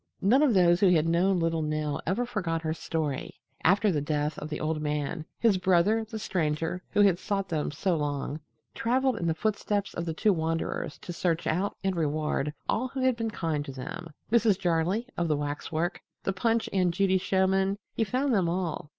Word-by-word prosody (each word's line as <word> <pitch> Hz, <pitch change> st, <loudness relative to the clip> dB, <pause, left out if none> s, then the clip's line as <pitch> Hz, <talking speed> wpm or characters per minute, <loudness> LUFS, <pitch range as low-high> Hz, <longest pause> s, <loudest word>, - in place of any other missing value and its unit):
None 240 Hz, +9 st, +5 dB
of 275 Hz, -8 st, +4 dB
those 175 Hz, -1 st, +5 dB
who 195 Hz, -, +5 dB
had 165 Hz, -3 st, +3 dB
known 180 Hz, +3 st, +3 dB
little 165 Hz, -1 st, 0 dB
Nell 155 Hz, -1 st, -2 dB
ever 195 Hz, +8 st, +1 dB
forgot 170 Hz, -8 st, -2 dB
her 155 Hz, 0 st, 0 dB
story. 155 Hz, -4 st, -3 dB, 0.3 s
After 200 Hz, +4 st, +4 dB
the 150 Hz, -4 st, 0 dB
death 150 Hz, +1 st, -1 dB
of 150 Hz, -, -6 dB
the 150 Hz, -, -4 dB
old 155 Hz, 0 st, -1 dB
man, 150 Hz, +1 st, -2 dB
his 215 Hz, -5 st, +3 dB
brother, 190 Hz, +5 st, +3 dB
the 220 Hz, 0 st, -6 dB
Stranger 165 Hz, -3 st, -1 dB
who 205 Hz, -, +2 dB
had 195 Hz, -4 st, +4 dB
sought 195 Hz, -2 st, -2 dB
them 155 Hz, -3 st, -1 dB
so 175 Hz, +5 st, 0 dB
long, 145 Hz, -1 st, -2 dB, 0.3 s
traveled 255 Hz, +1 st, +1 dB
in 170 Hz, -, -2 dB
the 160 Hz, -, +1 dB
footsteps 205 Hz, +1 st, -1 dB
of 170 Hz, -, -3 dB
the 165 Hz, -, -2 dB
two 210 Hz, +4 st, +3 dB
wanderers 165 Hz, -1 st, -2 dB
to 175 Hz, -, -7 dB
search 170 Hz, -1 st, 0 dB
out 190 Hz, +5 st, 0 dB
and 190 Hz, -1 st, 0 dB
reward 150 Hz, -2 st, 0 dB, 0.2 s
all 250 Hz, +4 st, 0 dB
who 260 Hz, +1 st, -5 dB
had 255 Hz, -1 st, +3 dB
been 230 Hz, -1 st, -2 dB
kind 165 Hz, -7 st, -2 dB
to 135 Hz, -, -6 dB
them 135 Hz, +6 st, -7 dB, 0.2 s
Mrs. 225 Hz, -4 st, +4 dB
Jarley 175 Hz, +6 st, +1 dB
of 175 Hz, -, +1 dB
the 150 Hz, -2 st, +1 dB
waxwork, 150 Hz, +4 st, -2 dB, 0.2 s
the 195 Hz, -, 0 dB
Punch 230 Hz, +3 st, +1 dB
and 185 Hz, -2 st, +3 dB
Judy 190 Hz, +1 st, +2 dB
showmen, 190 Hz, +1 st, +1 dB, 0.2 s
he 225 Hz, -, +1 dB
found 255 Hz, +5 st, 0 dB
them 185 Hz, -6 st, +2 dB
all. 170 Hz, -4 st, -2 dB
175 Hz, 200 wpm, -28 LUFS, 155-200 Hz, 0.3 s, None